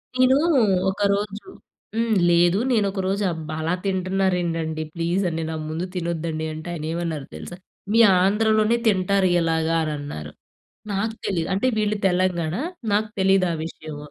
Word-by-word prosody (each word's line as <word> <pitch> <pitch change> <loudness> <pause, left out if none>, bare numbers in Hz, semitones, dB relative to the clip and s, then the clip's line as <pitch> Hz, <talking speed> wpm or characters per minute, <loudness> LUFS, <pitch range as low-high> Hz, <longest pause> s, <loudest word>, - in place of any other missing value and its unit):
నేను 255 +1 +5 0.5
ఒకరోజు 200 +1 -1 0.5
హ్మ్. 230 -1 +1 0.2
లేదు 175 +3 +4
నేను 215 -4 +3
ఒకరోజు 195 +1 -1
అబ్బా! 155 -1 -6
అలా 165 +3 0
తింటున్నారేంటండి 180 -4 -1
ప్లీజ్ 175 +3 0
అండి 165 0 -3
నా 160 - -3
ముందు 165 +3 -3
తినొద్దండి 165 -2 -2
అంటే 155 +2 -8
ఆయన 155 -2 -5
ఏమన్నారో 165 -4 -3
తెలుసా? 175 - -8 0.4
మీ 230 - +4 0.2
ఆంధ్రలోనే 215 +3 +3
తింటారు 195 -1 +2
ఇలాగా 165 0 +1
అనన్నారు. 145 - -5 0.6
నాకు 220 +3 -1
తెలియదు 170 -4 -1
అంటే 200 +7 0
వీళ్ళు 210 0 +1
తెలంగాణ 180 -3 0 0.4
నాకు 215 +1 +1
తెలీదా 190 -2 +3
విషయం. 155 -2 -8
180 Hz, 130 wpm, -23 LUFS, 165-200 Hz, 0.6 s, నేను